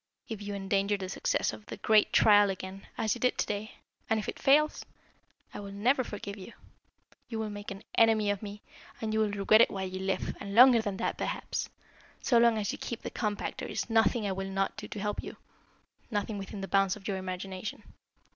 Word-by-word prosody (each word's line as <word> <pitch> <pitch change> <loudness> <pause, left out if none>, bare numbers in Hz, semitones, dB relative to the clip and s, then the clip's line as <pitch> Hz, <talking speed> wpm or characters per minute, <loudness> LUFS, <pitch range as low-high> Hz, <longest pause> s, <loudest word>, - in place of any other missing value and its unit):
If 220 -3 -6
you 205 0 -4
endanger 200 +1 0
the 190 -1 -5
success - - 0
of 210 - -11
the - - -7
great 215 -1 +4
trial 205 -1 +6
again, 190 +1 -6
as 220 -1 +1
you 240 - -7
did 250 - +2
to - - +1
day, 210 +1 -4 0.4
and 220 - +2
if 210 - -5
it - - -5
fails, 300 +3 +3 0.7
I - - -6
will 200 -1 -7
never 245 +7 +2
forgive 205 -2 -7
you. 195 +4 -10 0.8
You 225 - -4
will 220 -1 -3
make 205 0 -7
an 195 +1 -8
enemy 220 -2 +4
of 205 - -3
me, 205 -1 -8 0.4
and 220 -1 -2
you 220 - +1
will 215 -1 +2
regret 205 +2 +4
it - - +6
while 190 -1 -3
you 185 0 -5
live, 190 0 -2
and 200 0 -6
longer 245 -1 +8
than 205 -3 -3
that, - - -2
perhaps. - - -3 0.5
So 240 -3 +3
long 235 -1 +5
as 205 -2 -1
you - - -7
keep 235 - -5
the - - -5
compact 210 -3 -3
there - - -5
is - - -3
nothing 225 0 +3
I 200 - 0
will 195 0 -3
not 195 0 -1
do - - -7
to 210 - -6
help 210 +1 -2
you - - -9 0.7
nothing 205 -1 -2
within 195 +1 -7
the 195 - -4
bounds 195 -1 +2
of 205 -2 -10
your 195 -2 -1
imagination. 185 +2 -5
205 Hz, 220 wpm, -30 LUFS, 195-220 Hz, 0.8 s, longer